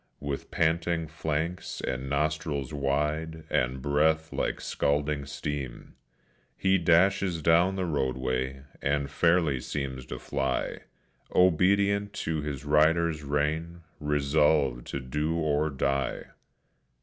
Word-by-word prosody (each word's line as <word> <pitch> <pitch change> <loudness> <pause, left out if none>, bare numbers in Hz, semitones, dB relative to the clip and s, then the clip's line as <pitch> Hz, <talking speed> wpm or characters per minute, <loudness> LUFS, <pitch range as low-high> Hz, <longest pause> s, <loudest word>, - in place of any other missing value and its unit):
With 70 -1 -4
panting 85 0 +1
flanks 80 +2 -3
and 65 +2 -3
nostrils 75 -1 -1
wide, 75 +3 -1
and 65 +1 0
breath 80 +2 +2
like - - -1
scalding 70 0 -1
steam, 70 -3 -5 0.6
He 95 0 +3
dashes 85 0 +3
down 85 +4 +4
the 95 -1 -1
roadway, 65 -3 -1 0.2
and 70 0 0
fairly 85 -4 +3
seems 65 -1 -4
to - - -5
fly, 70 -1 -2 0.6
Obedient 100 +3 +3
to 80 -1 -1
his 75 -1 -5
rider's 80 +2 +3
rein, 75 +4 -1 0.2
resolved 75 -3 +2
to - - -3
do 75 +5 -2
or 75 -1 +1
die. 70 -1 -1
75 Hz, 110 wpm, -28 LUFS, 70-80 Hz, 0.6 s, down